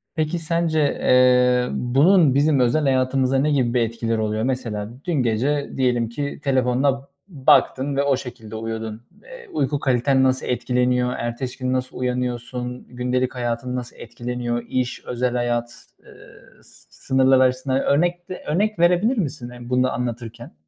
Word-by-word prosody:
Peki 155 +2 -1
sence, 165 -1 0
eee, 125 -3 +3
bunun 145 +5 +4
bizim 145 -1 +3
özel 125 +5 +2
hayatımızda 130 0 +1
ne 150 +2 +1
gibi 125 -5 +1
bir 125 - +2
etkileri 115 0 -1
oluyor? 110 0 -1
Mesela 115 -5 -3 0.2
dün 175 - -1
gece 135 +3 0
diyelim 120 -3 +1
ki 140 +4 -5
telefonuna 135 +1 +1 0.2
baktın 140 -3 +2
ve 140 - +2
o 140 -2 +2
şekilde 120 -4 -9
uyudun. 110 0 -5 0.2
Eee, - - -12
uyku 145 - -1
kaliten 130 0 +2
nasıl 130 0 +1
etkileniyor? 125 0 0
Ertesi 120 +2 -4
gün 130 0 -2
nasıl 130 0 -3
uyanıyorsun? 125 0 -3
Gündelik 125 +1 -2
hayatın 120 +1 -3
nasıl 125 -1 -6
etkileniyor? 120 -1 -4
İş, 125 -1 -2
özel 125 0 -1
hayat, 120 -1 -2 0.2
eee, - - -16 0.5
s - - -14
sınırlar 130 0 +2
açısından 130 +1 +2
örnek 175 +6 0
de 185 - -7
örnek 205 +5 0
verebilir 180 +9 +3
misin, 140 - -3
eee, 120 0 -11
bunu 125 0 +2
da 130 - 0
anlatırken? 120 -1 -5
125 Hz, 150 wpm, -22 LUFS, 120-140 Hz, 0.5 s, bunun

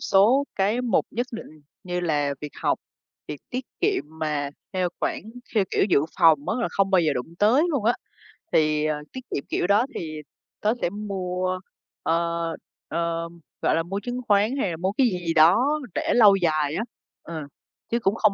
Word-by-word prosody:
số 230 +9 +4
cái 205 +5 +1
mục 245 - +2
nhất 245 +2 -2
định, 155 -9 -9 0.2
như 180 -2 -2
là 145 -4 0
việc 150 -1 -6
học, - - +2 0.5
việc 150 -2 -6
tiết 255 +1 -3 0.2
kiệm 405 -1 +2
mà 150 -2 -3 0.2
theo 185 -2 +1
khoản - - -1 0.3
theo 210 -3 +4
kiểu - - +3
dự 185 -8 +4 0.2
phòng 155 -3 +5
á - - +1
là - - 0
không 195 -1 +1
bao 190 -2 +5
giờ 155 -3 +2
đụng 135 +5 -5
tới 225 +8 +5
luôn 275 -9 -1
á. 235 - +5 0.6
Thì, 155 -1 +3
ờ, 155 -1 +1 0.2
tiết 260 - -5
kiệm 140 - -2
kiểu - - 0
đó 205 +5 +4
thì 155 -2 -5 0.4
tớ 215 +1 +3
sẽ - - +1
mua, 185 -2 -3 0.4
ờ, 170 0 0 0.4
ờ, 170 0 -2 0.3
gọi - - +2
là, 165 - +1
mua 195 +4 -3
chứng 245 0 -3
khoán 210 +4 +3
hay 230 - 0
là 165 - -4
mua 185 +3 0
cái 250 +5 +3
gì 185 -6 -1
gì 165 - +2
đó 225 - +5 0.2
để - - +1
lâu 210 -4 +8
dài 155 -5 +1
á, 215 - 0 0.4
ờ, 165 -1 -6 0.5
chứ 235 - +2
cũng 200 -2 +1
không 215 -2 +3
185 Hz, 195 wpm, -25 LUFS, 160-215 Hz, 0.6 s, lâu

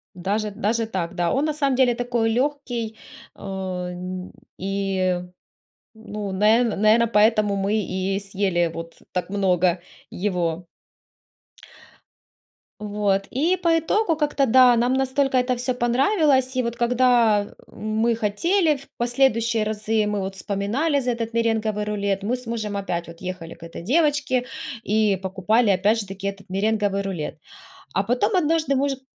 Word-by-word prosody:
Даже 205 +4 -2
даже 220 +3 -1
так, 185 -4 -3
да, 175 -1 0
он 275 +3 +1
на 310 - 0
самом 280 -3 +1
деле 250 -2 +4
такой 240 -2 0
легкий, 245 -3 -2 0.4
о 190 -2 -5
н 180 +1 -6 0.3
и, 190 -2 -1 0.7
ну, 210 -2 -6
на 215 +5 +4
наверно, 220 +1 +3
поэтому 215 -2 +3
мы 195 +2 0
и 190 +1 -2
съели 190 -4 0
вот 165 0 -7 0.2
так 180 0 -3
много 185 -3 +1 0.3
его. 175 -3 -2 2.1
Вот. 205 -2 0
И 325 +9 +1
по 335 -2 +2
итогу 340 +2 +1
как-то 295 -2 +1
да, 250 0 +6
нам 245 +2 +2
настолько 265 0 +1
это 250 0 +1
всё 245 +1 -1
понравилось, 260 - +2
и 255 - +2
вот 235 0 -3
когда 235 -4 +3 0.2
мы 220 +2 0
хотели 305 - +1
в 275 - -15
последующие 235 -2 +2
разы, 215 0 0
мы 210 0 -1
вот 190 0 -4
вспоминали 210 - 0
за 250 -1 0
этот 230 -1 -4
меренговый 220 -2 0
рулет, 200 -2 -1
мы 225 - -1
с 250 0 -8
мужем 220 -3 -3
опять 175 -4 -3
вот 170 0 -12
ехали 185 -3 -6
к - - -16
этой 165 0 -8
девочке 285 - +1 0.4
и 210 -1 +2
покупали 200 +4 +2
опять 205 +4 +2
же 205 - -6
таки 195 +1 -5
этот 195 0 -7
меренговый 205 0 0
рулет, 175 -6 -5 0.5
а - - +1
потом 245 - +1
однажды 320 -3 +1
может 270 0 0
215 Hz, 145 wpm, -23 LUFS, 195-250 Hz, 2.1 s, да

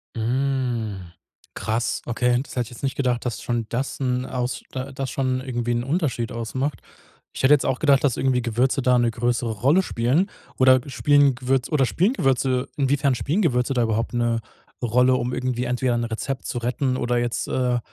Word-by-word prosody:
Mm. 120 -6 -1 0.4
Krass, 115 +2 -1
okay. 120 +1 +1
Das - - -10
hätte 125 - +1
ich 115 - -11
jetzt 120 - -12
nicht 135 -1 -1
gedacht, 125 -3 0
dass 120 -3 -3
schon 120 -2 -2
das 130 +4 -3
'n 125 -1 0
aus 125 -1 -3
d 130 +1 -4
das 135 -1 -3
schon 130 -1 -1
irgendwie 120 -2 -2
'n 120 - -1
Unterschied 135 - -1
ausmacht. 125 +5 -3 0.5
Ich - - -5
hätte 135 - +7
jetzt 145 - +3
auch 130 - 0
gedacht, 140 -3 +4
dass 135 -5 +2
irgendwie 130 -2 +1
Gewürze 125 +4 +1
da 125 0 +3
'ne 120 -1 +2
größere 120 0 -1
Rolle 135 - +3
spielen. 140 - +1 0.3
Oder 130 0 +6
spielen 145 -1 +3
Gewürz 130 0 0
oder 140 -4 +3
spielen 190 - +1
Gewürze 130 - +1
inwiefern 140 -1 +2
spielen 160 - 0
Gewürze 125 -5 +1
da 120 - +2
überhaupt 115 +1 -1
'ne 120 -1 +1 0.4
Rolle, 125 +2 +3
um 125 0 -2
irgendwie 125 -1 -1
entweder 125 0 0
'n 120 - -1
Rezept 130 +4 -4
zu - - -3
retten 125 +2 -1
oder 120 0 0
jetzt, 120 -1 -1
äh, 125 -1 0
125 Hz, 190 wpm, -23 LUFS, 120-135 Hz, 0.5 s, hätte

